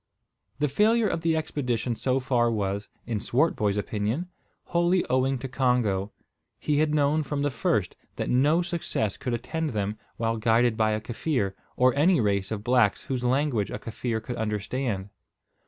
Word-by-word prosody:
The 150 +2 +1
failure 215 - +3
of 165 -4 -2
the 165 -1 +2
expedition 125 -6 -1
so 130 +3 0
far 120 -2 +2
was, 100 -2 -2 0.2
in 115 -3 -2
Swartboy's 110 -5 +1
opinion, 110 - -2 0.3
wholly 175 +1 +2
owing 130 +1 +2
to 135 - -5
Congo. 120 -6 +1 0.5
He 150 -1 0
had 155 0 +2
known 150 +1 +3
from 145 -1 -2
the 145 - +1
first 130 - 0 0.2
that - - -3
no 150 +7 +3
success 170 - -2
could 125 -2 -2
attend 155 +4 -3
them 105 +1 -2 0.2
while 115 0 0
guided 115 +1 +3
by 110 -1 +2
a 105 - -2
Kaffir, 110 -2 -1 0.2
or 125 0 +4
any 165 +5 +4
race 100 -3 +1
of 105 -2 -4
blacks 120 -3 +3
whose 130 -2 -3
language 125 -4 +1
a - - -4
Kaffir 115 0 -3
could 120 +1 -5
understand. 105 -1 -2
125 Hz, 165 wpm, -26 LUFS, 110-150 Hz, 0.5 s, or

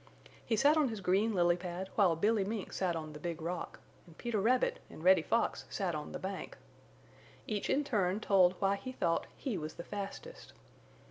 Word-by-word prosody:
He 225 - 0
sat 290 +7 +5
on 300 -4 +3
his 220 -2 -5
green 195 +4 +2
lily 175 -1 +4
pad 180 +1 -5
while 190 -6 +4
Billy 205 +4 +2
Mink 210 0 -4
sat 180 -3 0
on 155 -1 -5
the 150 - -9
Big 170 0 -4
Rock, 170 +1 -4 0.3
and 165 - -16
Peter 235 -4 -1
Rabbit 250 +4 +2
and 155 - -11
Reddy 185 -1 +6
Fox 230 +8 0
sat 190 -4 -2
on 150 -1 -5
the - - -4
bank. 190 0 -6 0.9
Each 210 -2 -2
in 290 - +2
turn 205 -7 +1
told 190 -4 +4
why 195 0 +1
he 255 +6 -6
thought 170 -8 0
he 235 - -3
was 155 0 -6
the 170 - -7
fastest. 205 - -7
195 Hz, 195 wpm, -33 LUFS, 175-220 Hz, 0.9 s, Reddy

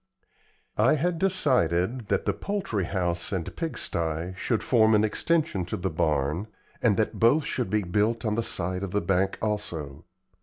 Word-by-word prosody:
I 120 +8 +5
had 165 +3 0
decided 125 - +1
that - - 0
the - - +1
poultry 195 - -2
house 90 -2 -2
and 90 -5 -3
pigsty 85 - -3
should 110 +4 -1
form 110 -3 +4
an 105 - +4
extension 145 - +1
to 90 - -4
the 95 0 -2
barn, 75 +4 0 0.3
and - - +3
that - - -1
both 135 +6 +4
should 125 -4 -2
be 105 -1 +1
built 105 +6 0
in 105 - +1
the 115 - 0
side 90 -4 -1
of 100 - -3
the 105 +3 0
bank 95 +2 +1
also. 95 -10 -3
105 Hz, 165 wpm, -26 LUFS, 90-120 Hz, 0.3 s, I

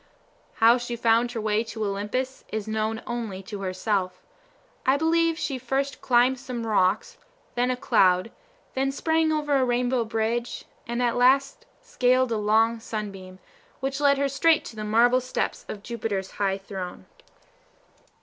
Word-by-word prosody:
How 230 +2 +5
she 240 0 -4
found 235 +1 +2
her 230 - -3
way 215 0 +1
to 220 -1 -4
Olympus 210 +7 -3
is 220 -1 -3
known 220 +1 -2
only 225 -5 -4
to 200 +1 -7
herself. 185 -1 -2 0.6
I 265 +2 +3
believe 330 +1 +2
she 270 -5 -3
first 270 +3 -2
climbed 250 +1 +3
some 245 -3 -5
rocks, 200 -2 +1 0.4
then 245 +1 +1
a 255 - 0
cloud, 185 -2 +3 0.4
then 270 +1 0
sprang 320 +2 +1
over 295 -2 0
a 265 - +2
rainbow 245 0 +1
bridge, 225 +2 -2 0.2
and 235 +1 -1
at 240 -1 +1
last 270 +2 +3 0.2
scaled 255 - +2
a 225 - +1
long 220 +2 +2
sunbeam, 195 -4 -6 0.4
which 270 +1 -3
led 280 -1 +4
her 280 0 +1
straight 315 +4 +3
to - - -9
the 215 - -5
marble 235 +4 +4
steps 255 - -3
of 205 - -7
Jupiter's 210 -5 -3
high 195 -1 -1
throne. 190 - -7
235 Hz, 155 wpm, -25 LUFS, 210-260 Hz, 0.6 s, How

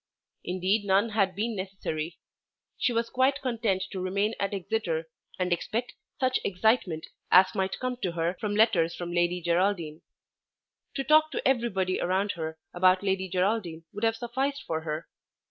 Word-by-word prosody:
Indeed 185 +4 0
none 200 +3 +3
had 195 -4 +1
been 220 +3 -1
necessary. 185 -4 -4 0.6
She - - +1
was 230 0 -1
quite 265 +2 +2
content 225 -7 0
to 190 - -4
remain 200 +4 0
at 200 - 0
Exeter 180 -4 -2 0.3
and 180 -1 +1
expect 235 +7 -3 0.3
such 255 -1 +2
excitement 185 -4 +1 0.2
as 185 +1 +6
might 190 0 -1
come 255 -1 -3
to 190 -8 -2
her 170 +1 0
from 205 -1 -2
letters 195 -7 +3
from 175 -1 -5
Lady 175 +1 +1
Geraldine. 170 -2 0 0.9
To 275 - -1
talk 310 +2 +5
to - - 0
everybody 200 -8 +1
around 190 +3 +1
her 160 -1 -5 0.2
about 185 +1 +4
Lady 190 -1 0
Geraldine 180 -3 0
would 205 - -6
have 225 0 +3
sufficed 265 +4 -2
for 160 -1 -2
her. 155 0 -4
190 Hz, 160 wpm, -28 LUFS, 175-225 Hz, 0.9 s, as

